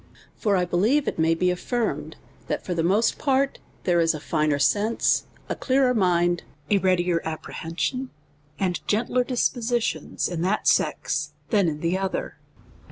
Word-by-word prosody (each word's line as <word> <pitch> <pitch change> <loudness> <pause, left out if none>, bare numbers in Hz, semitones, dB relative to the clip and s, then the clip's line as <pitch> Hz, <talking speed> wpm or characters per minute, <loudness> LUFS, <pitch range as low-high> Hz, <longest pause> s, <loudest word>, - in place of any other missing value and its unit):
For 205 -4 +1
I 180 - +1
believe 215 +12 +2
it - - -2
may 165 +1 +3
be 180 +2 +2
affirmed, 230 +6 -2 0.3
that - - -3
for 180 - -2
the 170 - 0
most 205 +7 +2
part 275 -1 +1 0.2
there 175 -2 +2
is 165 -1 +3
a - - -5
finer 150 -1 0
sense, 210 +9 +2 0.2
a - - -1
clearer 260 -1 +2
mind, 175 -4 +2 0.3
a 200 - +5
readier 180 -2 +2
apprehension, 165 +10 -3 0.5
and 180 -2 0
gentler 245 +4 +1
dispositions 240 -2 -1
in 175 -2 -4
that 190 +4 0
sex, - - +1 0.2
than, 200 -5 +3
in 150 -1 -3
the 170 +3 0
other. 195 -1 -3
185 Hz, 155 wpm, -25 LUFS, 170-235 Hz, 0.5 s, a